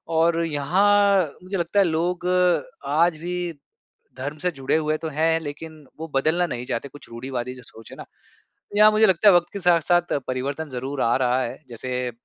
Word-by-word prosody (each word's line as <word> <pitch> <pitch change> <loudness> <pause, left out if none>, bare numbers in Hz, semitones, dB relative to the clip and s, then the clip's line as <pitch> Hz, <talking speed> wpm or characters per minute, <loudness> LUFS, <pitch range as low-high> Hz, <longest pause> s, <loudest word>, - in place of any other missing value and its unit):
और 165 +1 +2
यहाँ, 195 +6 +3 0.2
मुझे 190 +1 -4
लगता 170 +4 0
है 195 - +5
लोग 175 +2 -1 0.6
आज 160 +3 +2
भी 175 0 -3 0.6
धर्म 145 +4 -5
से 180 +4 -1
जुड़े 135 -3 -2
हुए 155 -1 0
तो 160 - -5
हैं 160 +2 +1
लेकिन 160 +1 -8 0.2
वो 160 - -5
बदलना 160 +6 +2
नहीं 120 -4 -5
चाहते 125 +3 -3
कुछ 145 +2 -14
रूढ़िवादी 125 +1 -5
जो 125 - -12
सोच 115 -1 -14
है - - -11
ना? - - -8 0.5
तो 205 - -10
यहाँ 215 0 +7
मुझे 215 +1 +4
लगता 190 +2 +3
है 195 - +6
वक़्त 175 0 +3
के 200 - -4
साथ-साथ 175 0 +2
परिवर्तन 140 +4 -3
ज़रूर 130 +2 -4
आ 115 - +2
रहा 130 0 +1
है। 120 - -4
जैसे 125 +1 -4
160 Hz, 190 wpm, -23 LUFS, 130-175 Hz, 0.6 s, यहाँ